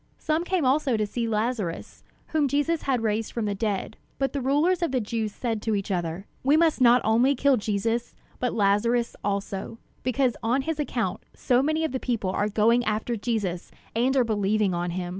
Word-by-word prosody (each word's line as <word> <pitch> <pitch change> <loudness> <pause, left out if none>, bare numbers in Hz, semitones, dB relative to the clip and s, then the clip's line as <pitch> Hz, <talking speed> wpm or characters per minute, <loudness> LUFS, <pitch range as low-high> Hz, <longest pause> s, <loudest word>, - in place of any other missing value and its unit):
Some 315 +2 0
came 355 -4 0
also 265 -2 +2
to 215 - +1
see 230 +3 -3
Lazarus, 215 -5 -2 0.3
whom 305 -3 +2
Jesus 290 +4 0
had 255 -4 0
raised 220 0 -1
from 230 -2 -2
the 205 - -1
dead; 205 +1 -2 0.2
but 270 -1 -1
the 280 - -2
rulers 300 +7 +2
of 340 - 0
the 260 - +1
Jews 220 -1 -2
said 225 -1 -3
to 220 -1 0
each 200 0 -3
other: 175 +1 -2 0.2
"We 285 +4 +4
must 320 -4 +2
not 245 0 +6
only 240 +6 +3
kill 275 +1 +3
Jesus, 225 +2 -1 0.2
but 250 - 0
Lazarus, 230 +4 +1
also; 200 +1 -3 0.2
because 255 -1 +1
on 245 +4 +1
his 320 +1 -3
account 230 -9 -2
so 250 0 +2
many 310 +3 0
of 320 - -1
the 260 - -2
people 225 -8 -1
are 205 +2 0
going 225 +3 +3
after 220 +2 -1
Jesus 205 -6 -2 0.3
and 255 +4 +2
are 255 - +5
believing 210 -3 +1
on 175 0 -1
him." 175 0 -3
230 Hz, 195 wpm, -26 LUFS, 210-265 Hz, 0.3 s, not